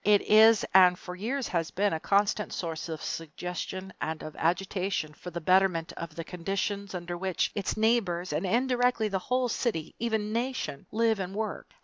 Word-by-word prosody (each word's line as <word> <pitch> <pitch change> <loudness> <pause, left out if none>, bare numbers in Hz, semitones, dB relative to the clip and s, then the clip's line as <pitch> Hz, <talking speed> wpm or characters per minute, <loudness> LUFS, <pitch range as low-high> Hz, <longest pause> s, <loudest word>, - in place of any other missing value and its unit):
It 205 -1 +4
is 220 +1 +6
and 180 -1 +7
for 180 0 -8
years 245 +8 -2
has 165 -2 -1
been 200 0 +1
a 160 - -1
constant 205 +3 +1
source 165 -1 -4
of 160 -2 -5
suggestion 180 +3 -5
and 160 0 -3
of 155 - -8
agitation 180 -1 -1
for 180 - -9
the 170 0 -5
betterment 180 -1 +2
of 165 -2 -7
the 165 - -4
conditions 195 +3 -3
under 175 0 -4
which 185 0 -1
its 205 0 -2
neighbors 205 -6 +1
and - - -1
indirectly 245 +1 +2
the 195 -1 -1
whole 250 +5 0
city, 220 -9 -2
even 220 -2 -1
nation 240 - -3
live 225 -1 +2
and 190 0 -4
work. 220 0 -4
190 Hz, 180 wpm, -29 LUFS, 175-220 Hz, -, and